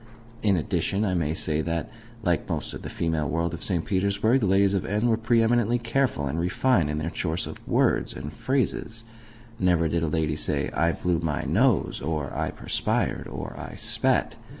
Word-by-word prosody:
In 100 Hz, -3 st, +3 dB
addition, 95 Hz, +6 st, 0 dB
I 95 Hz, -, 0 dB
may 80 Hz, -3 st, 0 dB
say 80 Hz, -1 st, -1 dB
that, 85 Hz, -1 st, -2 dB, 0.4 s
like 85 Hz, -5 st, 0 dB
most -, -, -3 dB
of -, -, -7 dB
the -, -, -6 dB
female 80 Hz, -3 st, -1 dB
world 85 Hz, +1 st, -1 dB
of 85 Hz, -, -6 dB
St. 85 Hz, -4 st, -1 dB
Petersburg, 100 Hz, +6 st, +2 dB
the 105 Hz, -, +1 dB
ladies 100 Hz, +1 st, +4 dB
of 95 Hz, -, 0 dB
N. 105 Hz, +4 st, 0 dB
were 115 Hz, -, +4 dB
pre 115 Hz, +1 st, +2 dB
eminently 120 Hz, 0 st, +2 dB
careful 120 Hz, -, 0 dB
and 70 Hz, +4 st, -2 dB
refined 90 Hz, -, +2 dB
in 75 Hz, -, -2 dB
their 80 Hz, +2 st, -2 dB
choice 85 Hz, -1 st, -1 dB
of -, -, -10 dB
words -, -, +2 dB
and 75 Hz, +2 st, -6 dB
phrases. 115 Hz, -, -1 dB, 0.6 s
Never 90 Hz, -3 st, +3 dB
did 85 Hz, +1 st, 0 dB
a 80 Hz, -, 0 dB
lady 80 Hz, -1 st, 0 dB
say, -, -, 0 dB
"I 85 Hz, +5 st, +2 dB
blew 90 Hz, -2 st, 0 dB
my 80 Hz, -3 st, -1 dB
nose," 105 Hz, -, +2 dB
or 75 Hz, -4 st, -3 dB
"I -, -, -1 dB
perspired," -, -, -1 dB
or -, -, -6 dB
"I -, -, -8 dB
spat." -, -, +1 dB
90 Hz, 195 wpm, -26 LUFS, 80-110 Hz, 0.6 s, ladies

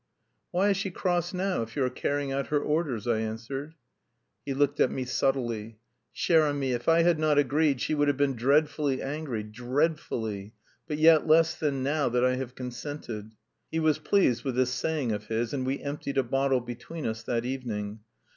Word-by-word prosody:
"Why 190 Hz, +3 st, +2 dB
is 200 Hz, -, +2 dB
she 195 Hz, 0 st, -2 dB
cross 175 Hz, -1 st, -1 dB
now 185 Hz, -4 st, -1 dB
if 115 Hz, 0 st, -6 dB
you 140 Hz, -, +1 dB
are -, -, +1 dB
carrying 140 Hz, +2 st, -1 dB
out 135 Hz, +1 st, -1 dB
her 150 Hz, -, +1 dB
orders?" 145 Hz, -8 st, -1 dB
I 115 Hz, -2 st, +1 dB
answered. 115 Hz, +8 st, -5 dB, 0.7 s
He 135 Hz, -, -1 dB
looked 145 Hz, +1 st, +1 dB
at -, -, +4 dB
me 130 Hz, -, -3 dB
subtly. 120 Hz, -5 st, -1 dB, 0.3 s
"Cher 160 Hz, -3 st, +3 dB
ami; 140 Hz, -2 st, -1 dB
if 120 Hz, +4 st, -1 dB
I 165 Hz, 0 st, +5 dB
had 170 Hz, -2 st, +3 dB
not 155 Hz, -2 st, +2 dB
agreed 145 Hz, 0 st, +3 dB
she 155 Hz, -, -1 dB
would 145 Hz, -1 st, +2 dB
have 145 Hz, -2 st, +2 dB
been 140 Hz, -2 st, +2 dB
dreadfully 140 Hz, +2 st, +2 dB
angry, 135 Hz, -6 st, -3 dB
dread 130 Hz, +9 st, 0 dB
ful 115 Hz, -, -4 dB
ly! 105 Hz, -1 st, -5 dB, 0.3 s
But 150 Hz, -2 st, -2 dB
yet 160 Hz, 0 st, +6 dB
less 160 Hz, +1 st, +5 dB
than 140 Hz, -4 st, -1 dB
now 145 Hz, +1 st, +1 dB
that 125 Hz, +1 st, +2 dB
I 125 Hz, 0 st, +2 dB
have 130 Hz, -1 st, -5 dB
consented." 125 Hz, -4 st, -6 dB, 0.4 s
He 160 Hz, -, 0 dB
was 155 Hz, -1 st, +2 dB
pleased 150 Hz, -, +2 dB
with 130 Hz, -3 st, -2 dB
this 130 Hz, 0 st, +2 dB
saying 145 Hz, -2 st, -1 dB
of 105 Hz, 0 st, -4 dB
his, 115 Hz, +2 st, -1 dB
and 130 Hz, -2 st, -2 dB
we 135 Hz, +1 st, -1 dB
emptied 140 Hz, -1 st, -4 dB
a 135 Hz, -, +4 dB
bottle 135 Hz, +1 st, +1 dB
between 125 Hz, +7 st, -7 dB
us 110 Hz, 0 st, -2 dB
that 120 Hz, +1 st, -2 dB
evening. 110 Hz, -5 st, -4 dB
135 Hz, 200 wpm, -28 LUFS, 120-155 Hz, 0.7 s, yet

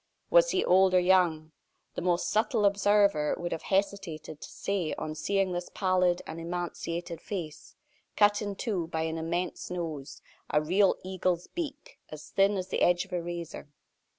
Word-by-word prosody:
Was -, -, +6 dB
he 375 Hz, -, +1 dB
old 185 Hz, 0 st, +5 dB
or -, -, +7 dB
young? 175 Hz, -4 st, +2 dB, 0.4 s
The -, -, -4 dB
most 175 Hz, 0 st, +1 dB
subtle 220 Hz, 0 st, +2 dB
observer 200 Hz, -5 st, +3 dB
would 175 Hz, 0 st, -4 dB
have 165 Hz, -, -3 dB
hesitated 190 Hz, -6 st, -2 dB
to -, -, -8 dB
say 190 Hz, -6 st, -2 dB
on 155 Hz, -, -4 dB
seeing 195 Hz, +4 st, 0 dB
this 175 Hz, 0 st, -4 dB
pallid 185 Hz, -2 st, +2 dB
and 160 Hz, +1 st, -7 dB
emaciated 170 Hz, 0 st, -4 dB
face, 165 Hz, -7 st, -6 dB, 0.4 s
cut 205 Hz, 0 st, +4 dB
in 205 Hz, -1 st, -3 dB
two 190 Hz, -8 st, -2 dB
by 160 Hz, -1 st, -2 dB
an 160 Hz, 0 st, -2 dB
immense 170 Hz, +3 st, -3 dB
nose 155 Hz, -6 st, -5 dB, 0.3 s
a 150 Hz, -, +3 dB
real 185 Hz, +6 st, +3 dB
eagle's 185 Hz, -2 st, -1 dB
beak 295 Hz, -4 st, -7 dB
as 155 Hz, 0 st, -10 dB
thin 195 Hz, +1 st, +3 dB
as 185 Hz, 0 st, -4 dB
the -, -, -2 dB
edge 175 Hz, +2 st, +3 dB
of 190 Hz, -, -14 dB
a 175 Hz, -, 0 dB
razor. 170 Hz, -3 st, -6 dB
180 Hz, 170 wpm, -29 LUFS, 165-200 Hz, 0.4 s, or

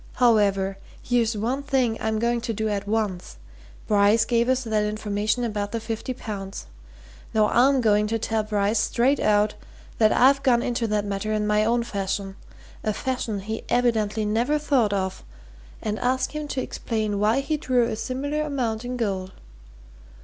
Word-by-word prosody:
However 200 Hz, -5 st, +2 dB, 0.2 s
here's 235 Hz, -3 st, 0 dB
one 245 Hz, +6 st, -1 dB
thing 265 Hz, -5 st, +1 dB
I'm 220 Hz, 0 st, 0 dB
going 235 Hz, +1 st, 0 dB
to 230 Hz, -, -3 dB
do 220 Hz, +1 st, -2 dB
at 205 Hz, -1 st, -3 dB
once. 200 Hz, -, -2 dB, 0.5 s
Bryce 210 Hz, +2 st, +4 dB
gave 235 Hz, +1 st, +1 dB
us 260 Hz, 0 st, +2 dB
that 215 Hz, -2 st, 0 dB
information 210 Hz, +2 st, -1 dB
about 205 Hz, -3 st, -2 dB
the 230 Hz, -, -2 dB
fifty 225 Hz, +3 st, -4 dB
pounds. 200 Hz, -6 st, -6 dB, 0.7 s
Now 215 Hz, -1 st, +4 dB
I'm 265 Hz, +2 st, +4 dB
going 210 Hz, -2 st, +3 dB
to 225 Hz, +1 st, 0 dB
tell 225 Hz, 0 st, -1 dB
Bryce 210 Hz, 0 st, 0 dB
straight 260 Hz, +4 st, +2 dB
out 210 Hz, 0 st, +2 dB, 0.5 s
that 215 Hz, -1 st, +5 dB
I've 275 Hz, +2 st, +5 dB
gone 245 Hz, -3 st, +3 dB
into 240 Hz, -1 st, -1 dB
that 210 Hz, -1 st, 0 dB
matter 200 Hz, +1 st, -3 dB
in 210 Hz, -1 st, 0 dB
my 210 Hz, 0 st, +2 dB
own 235 Hz, +2 st, +1 dB
fashion 195 Hz, -2 st, -3 dB, 0.5 s
a 215 Hz, -, 0 dB
fashion 230 Hz, -4 st, -3 dB
he 220 Hz, +3 st, -5 dB
evidently 220 Hz, -3 st, +1 dB
never 235 Hz, +8 st, +1 dB
thought 275 Hz, -8 st, +2 dB
of 190 Hz, -2 st, -2 dB, 0.6 s
and 215 Hz, 0 st, -2 dB
ask 255 Hz, +1 st, 0 dB
him 300 Hz, -1 st, -5 dB
to 265 Hz, -2 st, -2 dB
explain 215 Hz, -3 st, -2 dB
why 220 Hz, +6 st, +2 dB
he 305 Hz, +3 st, -1 dB
drew 255 Hz, -4 st, +1 dB
a 230 Hz, -, -1 dB
similar 280 Hz, +6 st, -2 dB
amount 250 Hz, -7 st, -2 dB
in 250 Hz, +1 st, -4 dB
gold. 190 Hz, -5 st, -2 dB
220 Hz, 170 wpm, -24 LUFS, 210-245 Hz, 0.7 s, that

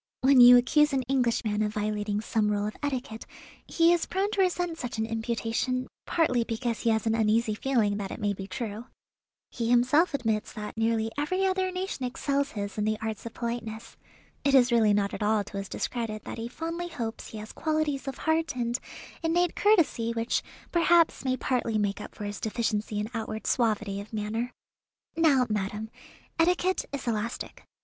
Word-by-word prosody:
When 265 Hz, -1 st, +6 dB
you 245 Hz, 0 st, +10 dB
accuse 295 Hz, +4 st, +3 dB
an 265 Hz, -1 st, +1 dB
Englishman 235 Hz, -4 st, 0 dB
of 210 Hz, 0 st, -1 dB
violating 210 Hz, 0 st, -1 dB
some 215 Hz, -1 st, 0 dB
rule 205 Hz, 0 st, 0 dB
of 215 Hz, -, -4 dB
etiquette, 260 Hz, -6 st, -4 dB, 0.4 s
he 335 Hz, 0 st, +4 dB
is 345 Hz, -, 0 dB
prone 390 Hz, +2 st, 0 dB
to 405 Hz, -, +1 dB
resent 355 Hz, -2 st, 0 dB
such 245 Hz, -1 st, -4 dB
an 220 Hz, -, 0 dB
imputation, 230 Hz, +3 st, -1 dB, 0.2 s
partly 255 Hz, -8 st, +2 dB
because 230 Hz, 0 st, -2 dB
he 235 Hz, -, +1 dB
has 220 Hz, 0 st, +1 dB
an 225 Hz, -, +2 dB
uneasy 225 Hz, 0 st, +2 dB
feeling 215 Hz, -3 st, +1 dB
that 200 Hz, -2 st, -4 dB
it -, -, -7 dB
may 205 Hz, -2 st, 0 dB
be 195 Hz, 0 st, -7 dB
true. 215 Hz, +3 st, -5 dB, 0.7 s
He 230 Hz, -1 st, -2 dB
himself 255 Hz, +7 st, +4 dB
admits 220 Hz, -5 st, -1 dB
that 210 Hz, -1 st, -6 dB
nearly 225 Hz, 0 st, 0 dB
every 370 Hz, +6 st, 0 dB
other 375 Hz, 0 st, +1 dB
nation 365 Hz, -6 st, -4 dB
excels 280 Hz, +3 st, -1 dB
his 205 Hz, 0 st, -4 dB
in -, -, +1 dB
the 215 Hz, 0 st, +1 dB
arts 220 Hz, 0 st, -4 dB
of 230 Hz, -, -10 dB
politeness. 230 Hz, -2 st, -5 dB, 0.5 s
It 280 Hz, -1 st, +3 dB
is 250 Hz, -1 st, +5 dB
really 225 Hz, -3 st, +4 dB
not 200 Hz, -1 st, +1 dB
at -, -, -5 dB
all 210 Hz, 0 st, +2 dB
to 200 Hz, 0 st, -8 dB
his 195 Hz, 0 st, -5 dB
discredit 225 Hz, -3 st, -3 dB
that -, -, -6 dB
he 230 Hz, -, -3 dB
fondly 330 Hz, +6 st, -4 dB
hopes 235 Hz, -9 st, -5 dB
he 220 Hz, -, -8 dB
has 215 Hz, +1 st, -8 dB
qualities 310 Hz, -3 st, -1 dB
of 270 Hz, -, -4 dB
heart 320 Hz, -2 st, 0 dB
and 240 Hz, 0 st, -1 dB, 0.4 s
innate 345 Hz, +1 st, +1 dB
courtesy 320 Hz, -, +3 dB
which 230 Hz, 0 st, 0 dB, 0.3 s
perhaps 340 Hz, -1 st, +4 dB
may 260 Hz, -1 st, 0 dB
partly 240 Hz, -4 st, 0 dB
make 205 Hz, -1 st, -1 dB
up -, -, -9 dB
for 210 Hz, -, -7 dB
his 205 Hz, 0 st, -4 dB
deficiency 215 Hz, -1 st, -1 dB
in 210 Hz, +1 st, -1 dB
outward 220 Hz, -1 st, -4 dB
suavity 215 Hz, -4 st, 0 dB
of 205 Hz, +2 st, -13 dB
manner. 220 Hz, +3 st, -2 dB, 0.6 s
Now, 290 Hz, -6 st, +4 dB
madam, 210 Hz, +1 st, -3 dB, 0.5 s
etiquette 360 Hz, +2 st, +2 dB
is 280 Hz, -2 st, -5 dB
elastic. 230 Hz, 0 st, -3 dB
235 Hz, 185 wpm, -28 LUFS, 215-280 Hz, 0.7 s, you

